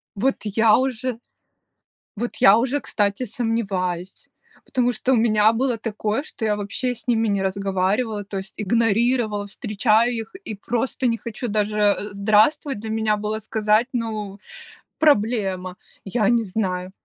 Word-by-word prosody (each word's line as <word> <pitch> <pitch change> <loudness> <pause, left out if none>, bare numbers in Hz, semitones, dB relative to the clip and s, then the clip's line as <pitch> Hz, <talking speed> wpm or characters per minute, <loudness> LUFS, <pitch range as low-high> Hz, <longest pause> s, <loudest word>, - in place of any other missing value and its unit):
Вот 260 +7 +1
я 215 +1 +4
уже 255 -2 -2 1.0
вот 240 +3 -4
я 200 +3 +7
уже, 265 +4 0
кстати, 205 +3 -1
сомневаюсь, 195 -6 -3 0.4
потому 245 -1 +1
что 245 +3 -1
у - - +5
меня 220 -1 +4
было 245 0 0
такое, 220 +3 -2
что 230 -7 -5
я 210 - +1
вообще 225 +5 -2
с - - -8
ними 225 -2 +2
не 200 -2 0
разговаривала, 200 +3 -1
то 195 0 -5
есть 190 +1 -7
игнорировала. 225 0 +1
Встречаю 215 +2 +1
их 225 +6 -5
и 220 - -5
просто 240 +5 -2
не 230 - +1
хочу 235 +2 -5
Даже 210 -1 +1
"здравствуй" 215 +8 +3
для 220 +1 -7
меня 220 -1 +1
было 210 +1 -3
сказать, 215 +2 +1
ну, 215 -4 -4 0.6
проблема. 205 -9 +1 0.3
Я 205 +1 0
не 235 -1 +3
знаю. 185 -3 -3
215 Hz, 145 wpm, -22 LUFS, 205-235 Hz, 1.0 s, я